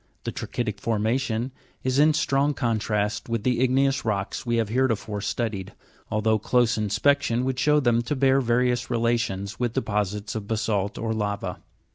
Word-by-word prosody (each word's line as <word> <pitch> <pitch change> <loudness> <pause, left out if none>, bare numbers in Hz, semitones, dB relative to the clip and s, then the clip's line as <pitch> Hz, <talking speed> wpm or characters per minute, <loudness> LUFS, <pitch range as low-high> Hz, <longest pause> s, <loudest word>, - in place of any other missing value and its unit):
The - - -3
tra'chytic 110 -4 -4
formation 115 +3 0 0.3
is 130 +1 +1
in 155 +1 +5
strong 145 -1 +1
contrast 110 -3 -1
with 115 -2 -1
the 125 0 +1
igneous 135 +1 +2
rocks 105 +2 -2
we 120 - +1
have 115 -2 0
heretofore 115 -4 0
studied, 105 -2 -3 0.4
al 110 -1 0
though 110 0 +3
close 120 +2 +2
inspection 125 +4 +1
would 130 -1 -1
show 150 +2 +4
them 120 -4 +2
to 135 +5 -2
bear 135 0 +3
various 120 0 +1
relations 115 -5 -1
with 120 -2 0
deposits 105 -4 -2
of 110 -2 -5
basa'lt 105 -2 -1
or 115 -1 -1
lava. 100 -3 -3
115 Hz, 160 wpm, -25 LUFS, 105-130 Hz, 0.4 s, in